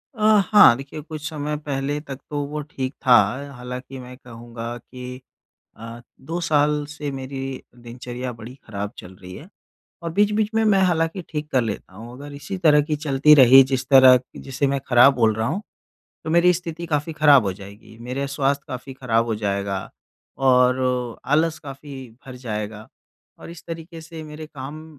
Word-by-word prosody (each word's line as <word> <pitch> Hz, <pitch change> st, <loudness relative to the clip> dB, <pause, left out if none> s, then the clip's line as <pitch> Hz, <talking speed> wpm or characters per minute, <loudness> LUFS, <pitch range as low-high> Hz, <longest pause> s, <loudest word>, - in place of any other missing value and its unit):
अ, -, -, -14 dB, 0.3 s
हाँ, 205 Hz, -, +8 dB
देखिए, 140 Hz, +3 st, -8 dB
कुछ 155 Hz, 0 st, -7 dB
समय 150 Hz, -1 st, -4 dB
पहले 145 Hz, 0 st, -3 dB
तक 135 Hz, -3 st, -8 dB
तो 145 Hz, -, -3 dB
वो 150 Hz, +1 st, -4 dB
ठीक 135 Hz, -2 st, -5 dB
था। 125 Hz, -, +6 dB, 0.4 s
हालाँकि 125 Hz, +2 st, -8 dB
मैं 125 Hz, 0 st, -10 dB
कहूँगा 120 Hz, -1 st, -8 dB
कि 125 Hz, +1 st, -10 dB, 0.6 s
अ, 115 Hz, +1 st, -9 dB, 0.2 s
2 165 Hz, +5 st, -4 dB
साल 150 Hz, -3 st, +1 dB
से 145 Hz, 0 st, -5 dB
मेरी 135 Hz, 0 st, -6 dB, 0.2 s
दिनचर्या 125 Hz, +1 st, -7 dB
बड़ी 115 Hz, +2 st, -11 dB
खराब 100 Hz, -1 st, -5 dB
चल 90 Hz, 0 st, -11 dB
रही 90 Hz, 0 st, -11 dB
है 155 Hz, -, -11 dB, 0.5 s
और 170 Hz, -, -4 dB
बीच-बीच 210 Hz, +2 st, +2 dB
में 225 Hz, 0 st, +2 dB
मैं 200 Hz, -3 st, +4 dB
हालाँकि 175 Hz, 0 st, 0 dB
ठीक 150 Hz, -1 st, -5 dB
कर 130 Hz, -, +4 dB
लेता 105 Hz, -4 st, -6 dB
हूँ। 115 Hz, +4 st, -10 dB
अगर 145 Hz, +2 st, -10 dB
इसी 190 Hz, +7 st, -6 dB
तरह 150 Hz, -4 st, +5 dB
की 150 Hz, +1 st, -2 dB
चलती 145 Hz, 0 st, +4 dB
रही, 135 Hz, -1 st, +8 dB
जिस 130 Hz, -1 st, -2 dB
तरह 130 Hz, -2 st, +8 dB, 0.2 s
जिसे 135 Hz, +1 st, -2 dB
मैं 140 Hz, 0 st, -1 dB
खराब 125 Hz, +2 st, +6 dB
बोल 115 Hz, -3 st, +2 dB
रहा 110 Hz, +1 st, -2 dB
हूँ, 195 Hz, +6 st, -3 dB, 0.6 s
तो 160 Hz, -, -4 dB
मेरी 170 Hz, +2 st, +5 dB
स्थिति 170 Hz, -1 st, -5 dB
काफ़ी 150 Hz, +1 st, -2 dB
खराब 145 Hz, -5 st, +5 dB
हो 95 Hz, -, -1 dB
जाएगी। 100 Hz, +3 st, -13 dB
मेरे 130 Hz, +4 st, -4 dB
स्वास्थ्य 140 Hz, 0 st, -1 dB
काफ़ी 130 Hz, 0 st, -7 dB
खराब 115 Hz, -3 st, 0 dB
हो 115 Hz, -, -1 dB
जाएगा 100 Hz, -2 st, -2 dB, 0.6 s
और 125 Hz, -1 st, +3 dB, 0.4 s
आलस 155 Hz, +3 st, +1 dB
काफ़ी 140 Hz, 0 st, -10 dB, 0.3 s
भर 130 Hz, -, -9 dB
जाएगा 110 Hz, -3 st, -6 dB, 0.5 s
और -, -, -11 dB
इस 170 Hz, -2 st, -12 dB
तरीके 165 Hz, 0 st, -8 dB
से 160 Hz, 0 st, -10 dB
मेरे 155 Hz, 0 st, -9 dB
काम 150 Hz, +2 st, -9 dB
135 Hz, 175 wpm, -22 LUFS, 125-155 Hz, 0.6 s, हाँ